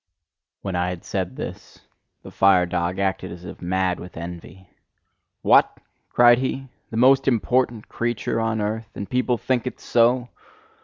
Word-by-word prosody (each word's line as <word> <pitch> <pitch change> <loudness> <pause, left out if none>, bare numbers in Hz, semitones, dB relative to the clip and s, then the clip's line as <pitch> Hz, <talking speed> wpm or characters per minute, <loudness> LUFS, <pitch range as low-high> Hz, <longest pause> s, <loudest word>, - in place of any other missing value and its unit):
When 95 -2 -3
I 90 +1 0
had 90 -2 -7
said - - -3
this, - - -8 0.4
the - - -10
fire 95 -2 +4
dog 90 +1 -2
acted 95 -1 -1
as 85 +1 -10
if - - -9
mad 90 0 0
with 90 - -10
envy. 85 +2 -9 0.8
"What!" - - +4 0.3
cried 120 0 +6
he, 135 0 -3 0.2
"the 110 - -5
most 135 +3 +5
important 120 -2 +1
creature 120 -1 -2
on 110 -1 0
earth? 110 +1 -3
And 100 - -5
people 125 -1 0
think 125 +1 -1
it - - -6
so?" 120 +1 +2
110 Hz, 155 wpm, -23 LUFS, 90-120 Hz, 0.8 s, cried